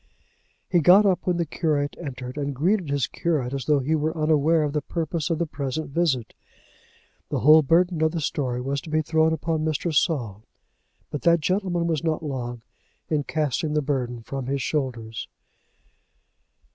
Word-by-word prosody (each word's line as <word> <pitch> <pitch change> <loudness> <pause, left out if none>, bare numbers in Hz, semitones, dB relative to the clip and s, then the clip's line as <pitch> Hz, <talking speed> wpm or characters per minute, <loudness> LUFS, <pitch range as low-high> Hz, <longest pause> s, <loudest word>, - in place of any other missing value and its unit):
He 175 - +3
got 185 +6 +6
up 185 -2 +1
when 180 -1 +2
the 170 - 0
curate 145 -2 -1
entered, 125 -3 -6
and 140 -1 -3
greeted 175 +4 +1
his 140 -3 +1
curate, 145 -7 -2
as 135 -3 -3
though 150 -1 +3
he 145 +5 0
were 155 +1 0
unaware 155 +1 +3
of 145 -1 -2
the 150 - 0
purpose 165 +1 -3
of 165 - 0
the 170 - 0
present 140 0 -4
visit. 135 -8 0 1.0
The - - -1
whole 155 +3 +8
burden 170 +3 +2
of 160 0 +3
the 170 - -2
story 130 -4 -2
was 140 +2 -2
to - - -10
be 155 0 +1
thrown 160 +1 +2
upon 160 0 -1
Mr. 160 +1 -1
Saul. 125 - 0 0.7
But 150 - -4
that 170 0 +4
gentleman 180 0 0
was 165 -2 -1
not 160 -1 -1
long 120 -5 -5 0.5
in 150 -3 0
casting 150 0 -1
the 150 - +1
burden 125 -4 -2
from 135 +1 -5
his 135 0 -1
shoulders. 120 -7 -3
150 Hz, 175 wpm, -24 LUFS, 135-165 Hz, 1.0 s, whole